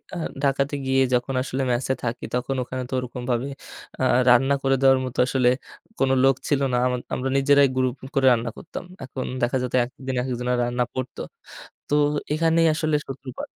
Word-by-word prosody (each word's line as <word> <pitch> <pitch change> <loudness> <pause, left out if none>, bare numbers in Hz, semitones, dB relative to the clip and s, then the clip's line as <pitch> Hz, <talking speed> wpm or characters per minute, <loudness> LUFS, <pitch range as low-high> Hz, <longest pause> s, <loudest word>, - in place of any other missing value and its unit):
আ - - -4 0.3
ঢাকাতে 140 +1 +1
গিয়ে 135 0 +2
যখন 125 +2 0
আসলে 130 +1 -3
ম্যাসে 125 +2 0
থাকি, 120 0 -3
তখন 125 +2 -1
ওখানে 130 +1 -5
তো - - -7
ওরকমভাবে 125 0 -3 0.5
আ - - +2 0.3
রান্না 135 +3 +5
করে 135 0 +3
দেওয়ার 135 -1 +5
মতো 125 - -6
আসলে 125 -1 +3 0.5
কোনো 135 0 +3
লোক 135 0 +5
ছিল 140 -2 +1
না। 125 - +3
আমা 125 0 0 0.2
আমরা 135 +1 -1
নিজেরাই 140 +1 +5
গ্রুপ 130 -1 +1 0.2
করে 135 -1 +3
রান্না 115 0 -1
করতাম। - - -8 0.2
এখন 130 0 -5 0.2
দেখা 120 +2 +1
যেত 125 - -4
একেক 130 +4 -10
দিন 130 - -1
একেকজনের 125 -1 -1
রান্না 120 +1 0
পড়তো। 130 -1 -5 0.7
তো - - -1 0.4
এখানেই 165 +1 +3
আসলে 155 0 0
সূত্রপাত। 130 -1 -7
130 Hz, 175 wpm, -24 LUFS, 125-135 Hz, 0.7 s, রান্না